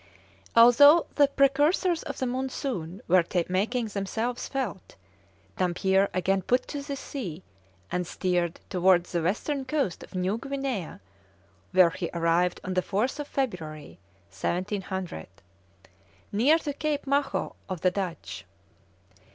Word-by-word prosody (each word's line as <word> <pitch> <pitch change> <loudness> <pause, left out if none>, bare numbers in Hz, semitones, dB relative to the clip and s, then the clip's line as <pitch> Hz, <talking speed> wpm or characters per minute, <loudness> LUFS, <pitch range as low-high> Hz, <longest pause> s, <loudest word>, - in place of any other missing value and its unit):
Although 285 +8 +8
the 290 -1 +5
precursors 290 +6 +2
of 280 - -6
the 260 - -1
monsoon 250 - -3
were 180 0 +5 0.3
making 220 +6 0
themselves 220 +4 -3
felt, 255 -8 -4 0.6
Dampier 190 +2 +2
again 190 +1 +1
put 250 +7 +1
to 290 - -4
sea, 265 - -6 0.5
and 180 -1 -1
steered 175 -2 -1
towards 180 -1 +3
the 170 - 0
western 250 - -1
coast 265 - -1
of - - -12
New 185 +4 0
Guinea, 270 - -4 0.7
where 180 -2 +6
he 175 -1 -4
arrived 170 +1 +2
on 185 - -3
the 185 - +2
4th 235 +10 -1
February, 165 - -4 0.3
1700, 185 - -3 1.0
near 255 +10 +4
to 295 -3 -4
Cape 295 0 -2
Maho 280 0 0 0.2
of 185 -3 -4
the 185 - +3
Dutch. 170 - -5
200 Hz, 120 wpm, -27 LUFS, 180-270 Hz, 1.0 s, Although